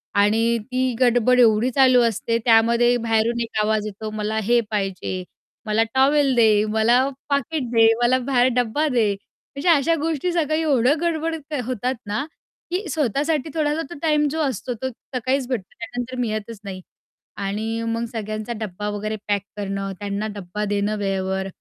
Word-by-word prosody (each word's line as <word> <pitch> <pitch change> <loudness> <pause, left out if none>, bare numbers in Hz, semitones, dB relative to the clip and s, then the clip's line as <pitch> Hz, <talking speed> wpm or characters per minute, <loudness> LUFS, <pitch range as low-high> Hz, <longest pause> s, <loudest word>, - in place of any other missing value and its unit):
आणि 225 +3 +3
ती 255 -1 0
गडबड 250 0 +4
एवढी 225 +1 +4
चालू 255 -2 +6
असते, 230 +1 -1
त्यामध्ये 235 +1 +4
बाहेरून 225 +1 +1
एक 225 -2 -3
आवाज 215 0 0
येतो, 215 +1 -6
मला 215 0 -2
हे 240 +3 +3
पाहिजे, 195 -2 -2 0.4
मला 215 +1 +2
टॉवेल 275 +1 +3
दे, 215 -2 +4
मला 220 +3 +3 0.3
पाकीट 280 +1 0
दे, 225 -1 +6 0.2
मला 255 +2 +4
बाहेर 250 -2 +4
डब्बा 250 +6 +1
दे. 235 -6 +2 0.5
म्हणजे 285 +6 0
अशा 330 +1 +4
गोष्टी 325 +2 -1
सकाळी 315 -1 +1
एवढं 285 -1 +2
गडबड 330 -1 -1 0.3
होतात 255 +1 -2
ना, 210 +7 -2 0.5
की 370 +1 -2
स्वतःसाठी 295 +1 0
थोडासा 305 0 0
तो 345 - -8
टाईम 300 -2 +2
जो 320 - -3
असतो, 260 -3 -2
तो 260 +3 -4 0.3
सकाळीच 260 +1 0
भेटतो. 235 -8 -4
त्यानंतर 245 +2 -5
मी 240 -3 0
येतच 215 0 -5
नाही. 190 -2 -7 0.6
आणि 215 +3 -3
मग 230 +1 -1
सगळ्यांचा 215 +1 -4
डब्बा 210 0 -4
वगैरे 210 +1 -3
पॅक 205 -1 +1 0.2
करणं, 195 -1 -3
त्यांना 205 +1 -3
डब्बा 200 +2 -4
देणं 205 +1 0
वेळेवर, 190 -1 -2
235 Hz, 160 wpm, -22 LUFS, 210-265 Hz, 0.6 s, चालू